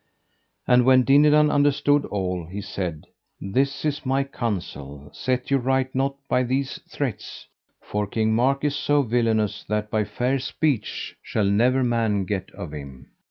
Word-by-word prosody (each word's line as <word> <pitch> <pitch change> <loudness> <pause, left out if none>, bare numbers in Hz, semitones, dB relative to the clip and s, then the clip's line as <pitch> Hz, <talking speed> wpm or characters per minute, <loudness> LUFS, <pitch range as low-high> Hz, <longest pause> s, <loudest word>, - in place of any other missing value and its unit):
And 125 0 +5
when 130 0 +5
Dinadan 150 +2 +5
understood 145 0 +3
all, 90 -4 -3
he 95 +4 -6
said: 95 -6 -5 0.3
This 135 +10 -1
is 150 -1 -1
my 135 0 +1
counsel: 75 - -5
set 125 +2 -2
you 135 - +4
right 130 +1 0
nought 135 +1 0
by 125 - +2
these 130 +2 -2
threats, - - -5 0.3
for 105 0 -3
King 110 +1 0
Mark 135 +5 +2
is 145 -1 +1
so 145 -1 +2
villainous, 110 -3 0
that 105 0 -2
by 110 -1 +1
fair 125 +6 -1
speech 135 -2 -2
shall 105 - -1
never 120 +6 +3
man 115 -5 +1
get 95 0 -3
of 85 - -7
him. 70 -3 -10
120 Hz, 155 wpm, -24 LUFS, 100-135 Hz, 0.3 s, And